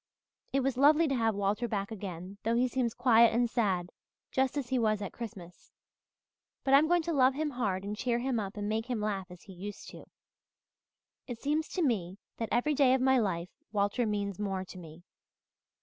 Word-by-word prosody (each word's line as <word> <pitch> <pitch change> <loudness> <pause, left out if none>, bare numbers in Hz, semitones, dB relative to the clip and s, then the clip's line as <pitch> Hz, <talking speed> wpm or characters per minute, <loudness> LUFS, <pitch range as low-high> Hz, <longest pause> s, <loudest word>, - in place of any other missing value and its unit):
"It's 270 -1 0
lovely 300 +4 +5
to - - 0
have 225 -3 +1
Walter 205 +4 0
back 200 -1 -3
again 190 -2 -7
though 230 +1 0
he 250 +2 +3
seems 245 -2 -1
quiet 235 -2 +5
and 240 0 +3
sad, 190 -7 0 0.4
just 265 +1 +1
as 265 -4 -3
he 260 -1 +1
was 215 -2 +2
at 200 -2 -5
Christmas. 185 -7 -9 0.9
But 270 - +1
I'm 290 +3 +7
going 350 0 +3
to 335 +1 -2
love 260 -2 +4
him 300 0 -1
hard 205 -7 -2
and 205 +1 -4
cheer 235 +2 0
him 245 -1 -1
up 200 0 -5
and 205 0 -3
make 220 +2 -1
him 245 -3 -2
laugh 200 -3 -2
as 180 -1 -13
he 195 - -12
used 200 +3 -8
to. - - -11 1.2
It 240 -2 -6
seems 300 +4 0
to 360 - 0
me 195 - -1 0.2
that 225 - -3
every 270 +6 +2
day 265 -2 +4
of 260 - -1
my 265 0 +4
life 180 -5 -1 0.2
Walter 210 +3 +1
means 200 -2 -2
more 195 -2 -2
to 185 - -11
me. 165 0 -12
225 Hz, 200 wpm, -30 LUFS, 200-260 Hz, 1.2 s, I'm